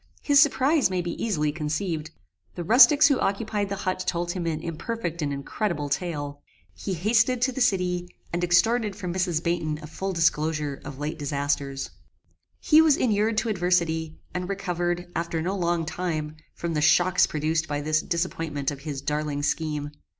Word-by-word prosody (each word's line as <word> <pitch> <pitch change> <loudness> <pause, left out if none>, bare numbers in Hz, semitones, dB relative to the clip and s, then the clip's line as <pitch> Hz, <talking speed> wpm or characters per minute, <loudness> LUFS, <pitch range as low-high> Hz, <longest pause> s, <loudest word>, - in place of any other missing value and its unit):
His 285 -1 +5
surprize 290 -1 +3
may 185 -1 -1
be 170 - -3
easily 155 -10 0
conceived. 155 +1 -3 0.5
The 175 - -4
rustics 255 - +7
who 280 -3 +2
occupied 205 0 -1
the 200 - -2
hut 185 0 -1
told 175 0 -1
him 175 -2 -3
an 155 -2 -1
imperfect 170 +1 -4
and 145 -1 -1
incredible 145 +2 -2
tale. 145 -3 -3 0.3
He 190 - -4
hasted 225 +7 +2
to 260 - +2
the 265 - -4
city, 180 -6 +1 0.2
and 175 +1 -1
extorted 210 +4 +2
from 180 -4 -4
Mrs. 175 -3 0
Baynton 170 -3 -1
a 155 - -9
full 190 +5 -4
disclosure 155 -4 0
of 140 -2 -8
late 150 +3 -4
disasters. 140 -1 -2 0.7
He 310 0 +6
was 310 -3 +4
inured 215 -1 +1
to 225 - +1
adversity, 170 -4 0 0.2
and 180 0 -3
recovered, 175 -3 -2
after 170 0 -2
no 180 +5 -1
long 170 -3 0
time, 155 -3 -3 0.2
from 170 -1 -3
the 150 - 0
shocks 175 +3 +4
produced 155 +1 -1
by 145 -1 -2
this 155 +1 +1
disappointment 165 -5 -2
of 140 - -7
his 140 -2 -5
darling 150 0 -2
scheme. 150 -1 -1
170 Hz, 170 wpm, -25 LUFS, 155-195 Hz, 0.7 s, rustics